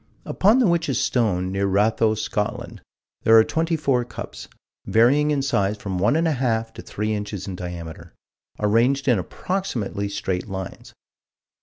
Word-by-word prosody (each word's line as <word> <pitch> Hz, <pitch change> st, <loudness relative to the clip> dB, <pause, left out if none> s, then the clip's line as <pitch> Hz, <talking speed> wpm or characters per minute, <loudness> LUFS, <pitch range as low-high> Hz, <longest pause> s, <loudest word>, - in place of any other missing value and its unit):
Upon 210 Hz, +6 st, +3 dB
the 260 Hz, -, +4 dB
Witch's 165 Hz, -, +1 dB
Stone, 95 Hz, -7 st, 0 dB
near 100 Hz, +1 st, 0 dB
Ratho, 110 Hz, +3 st, +2 dB
Scotland, 105 Hz, 0 st, -3 dB, 0.4 s
there 115 Hz, 0 st, +6 dB
are 110 Hz, -, +8 dB
twenty 165 Hz, +6 st, -1 dB
four 135 Hz, -5 st, +1 dB
cups, 120 Hz, -, -8 dB, 0.4 s
varying 135 Hz, +7 st, +4 dB
in 145 Hz, -2 st, +1 dB
size 105 Hz, -6 st, 0 dB
from 95 Hz, -3 st, -4 dB
one 105 Hz, +10 st, +3 dB
and 165 Hz, +1 st, +2 dB
a -, -, +2 dB
half 115 Hz, -4 st, -1 dB
to -, -, -9 dB
three 105 Hz, +1 st, -3 dB
inches 105 Hz, -2 st, -4 dB
in 95 Hz, -, -5 dB
diameter, 85 Hz, -2 st, -8 dB, 0.4 s
arranged 120 Hz, +6 st, +2 dB
in 120 Hz, -6 st, +4 dB
approximately 110 Hz, -, -3 dB
straight 95 Hz, -2 st, -3 dB
lines. 95 Hz, -1 st, -7 dB
110 Hz, 155 wpm, -23 LUFS, 100-140 Hz, 0.4 s, are